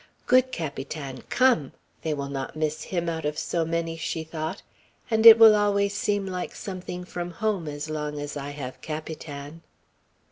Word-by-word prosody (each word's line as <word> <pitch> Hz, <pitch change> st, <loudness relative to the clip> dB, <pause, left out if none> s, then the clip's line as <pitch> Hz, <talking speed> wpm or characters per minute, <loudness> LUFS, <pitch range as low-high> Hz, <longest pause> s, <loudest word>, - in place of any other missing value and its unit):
"Good 255 Hz, +1 st, +4 dB
Capitan, 140 Hz, -, -5 dB
come! 250 Hz, -, +3 dB, 0.3 s
They 155 Hz, -2 st, -1 dB
will 140 Hz, -1 st, -4 dB
not 135 Hz, 0 st, -5 dB
miss 155 Hz, 0 st, -1 dB
him 175 Hz, -2 st, -2 dB
out 165 Hz, -1 st, -2 dB
of 150 Hz, 0 st, -2 dB
so 170 Hz, -, -1 dB
many," 165 Hz, 0 st, -2 dB
she 160 Hz, 0 st, -3 dB
thought, 160 Hz, +3 st, -5 dB, 0.5 s
"and 220 Hz, +1 st, +6 dB
it 225 Hz, 0 st, +12 dB
will 225 Hz, -1 st, +9 dB
always 200 Hz, -1 st, +2 dB
seem 205 Hz, -1 st, 0 dB
like 185 Hz, -1 st, -4 dB
something 180 Hz, -2 st, -6 dB
from 175 Hz, -1 st, -5 dB
home, 195 Hz, -2 st, -2 dB
as 145 Hz, +1 st, -5 dB
long 150 Hz, -1 st, -3 dB
as 145 Hz, 0 st, -5 dB
I 145 Hz, 0 st, -5 dB
have 140 Hz, -3 st, -7 dB
Capitan." 155 Hz, -1 st, -7 dB
165 Hz, 170 wpm, -26 LUFS, 150-195 Hz, 0.5 s, it